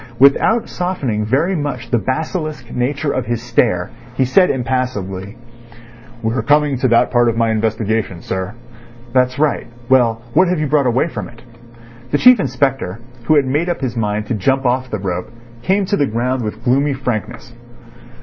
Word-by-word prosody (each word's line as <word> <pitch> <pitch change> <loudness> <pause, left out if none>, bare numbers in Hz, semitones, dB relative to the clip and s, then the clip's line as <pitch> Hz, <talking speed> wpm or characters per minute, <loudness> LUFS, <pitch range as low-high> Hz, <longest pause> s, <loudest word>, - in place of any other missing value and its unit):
Without 140 - +4
softening 145 - -2
very 145 - +1
much 145 -7 -4
the 120 - +3
basilisk 155 - -3
nature 140 +4 -1
of 130 -3 -2
his 120 -1 -1
stare, 115 -6 0 0.2
he 130 - +2
said 180 +9 +4
impassively: 115 -6 -3 0.9
"We 110 0 0
are 125 - 0
coming 145 +4 +2
to 130 - +2
that 115 -1 +3
part 120 -1 +3
of 115 - -2
my 115 -1 +2
investigation, 110 -4 -1
sir." 95 +3 -4 0.6
"That's 130 0 +2
right. 150 0 0 0.2
Well, 120 -3 +3
what 185 - +5
have 180 -2 0
you 155 - 0
brought 145 -2 +2
away 125 +6 +2
from - - -6
it?" 120 0 -16 0.7
The 145 - +2
Chief 250 +6 +7
Inspector, 135 - -1 0.3
who 155 - +4
had 145 -2 +4
made 150 +7 0
up 175 - -1
his 125 -3 -2
mind 105 -2 -1
to 115 - -2
jump 135 +6 0
off 130 +1 0
the 110 - -2
rope, 90 -2 -4 0.3
came 195 +7 +1
to 200 +2 0
the 145 - +2
ground 125 +3 -1
with 105 -2 -5
gloomy 140 +3 +2
frankness. 125 -1 -4
125 Hz, 180 wpm, -18 LUFS, 115-145 Hz, 0.9 s, Chief